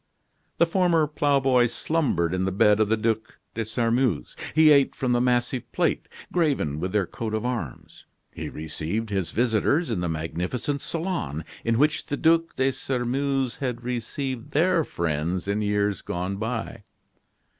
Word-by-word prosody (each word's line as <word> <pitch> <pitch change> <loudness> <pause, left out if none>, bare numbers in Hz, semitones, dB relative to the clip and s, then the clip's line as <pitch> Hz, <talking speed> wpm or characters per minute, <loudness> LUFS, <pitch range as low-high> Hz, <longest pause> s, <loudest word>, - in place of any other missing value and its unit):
The 170 - +5
former 170 -2 +3
ploughboy 135 -4 +3
slumbered 120 - 0
in 95 0 0
the 95 - 0
bed 105 +2 +4
of 110 -1 +2
the 110 - +3
Ducs 110 0 -1 0.2
de 115 - -2
Sairmeuse; 115 - 0 0.2
he 155 -1 +7
ate 140 -2 +4
from 130 -2 -1
the 120 0 +3
massive 125 0 0
plate, - - 0 0.2
graven 140 - +1
with 90 +3 -2
their 105 -2 +1
coat 110 +4 -4
of 110 - -2
arms; 115 - -5 0.3
he - - -6
received 80 +8 -4
his 95 -4 -1
visitors 120 - +1
in 105 - -1
the 90 -1 -1
magnificent 90 - -2
salon 160 - -3 0.2
in 115 0 +1
which 150 +4 +2
the 145 - -2
Ducs 165 +2 +2
de 130 +1 +2
Sairmeuse 135 0 -1
had 125 -3 -3
received 125 +1 -4
their 170 +2 +3
friends 85 - -2
in 100 +1 0
years 105 -2 0
gone 90 +3 -3
by. 110 +2 -4
120 Hz, 155 wpm, -25 LUFS, 100-140 Hz, 0.3 s, he